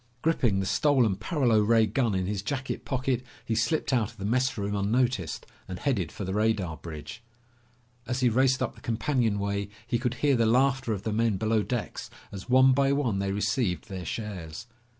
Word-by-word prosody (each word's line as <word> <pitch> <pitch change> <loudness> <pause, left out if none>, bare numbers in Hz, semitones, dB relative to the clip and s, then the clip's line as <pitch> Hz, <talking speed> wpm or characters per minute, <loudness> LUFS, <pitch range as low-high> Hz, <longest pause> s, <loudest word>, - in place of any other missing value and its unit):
Gripping 120 -11 +2
the 95 - -1
stolen 125 -3 +3
paralo 120 - +1
ray 110 +1 +4
gun 115 -1 0
in 95 -1 0
his 100 +1 -2
jacket 130 +5 -4
pocket, 130 -1 -1 0.2
he 115 - -1
slipped 115 +6 0
out 115 -5 +2
of 115 - -17
the 100 - -5
messroom 110 -3 0
unnoticed 105 - 0 0.2
and 90 - -5
headed 100 - -1
for 100 - -6
the 95 - -3
radar 105 -6 0
bridge. 80 +7 -9 0.9
As 125 +1 -2
he 125 - +4
raced 130 +2 +3
up - - -2
the - - -17
companionway 105 -5 -1 0.2
he 120 0 -1
could 125 -1 -1
hear 145 -2 +2
the 115 -2 +2
laughter 130 +1 +2
of 100 -2 -3
the 110 - -2
men 110 -2 +1
below 110 +1 +1
decks 115 -5 -4 0.2
as 95 +2 -9
one 130 +1 +6
by 135 +1 +3
one 130 -8 0
they 100 0 -1
received 100 -1 -1
their 95 -2 -5
shares. 95 -3 -6
110 Hz, 190 wpm, -27 LUFS, 100-130 Hz, 0.9 s, one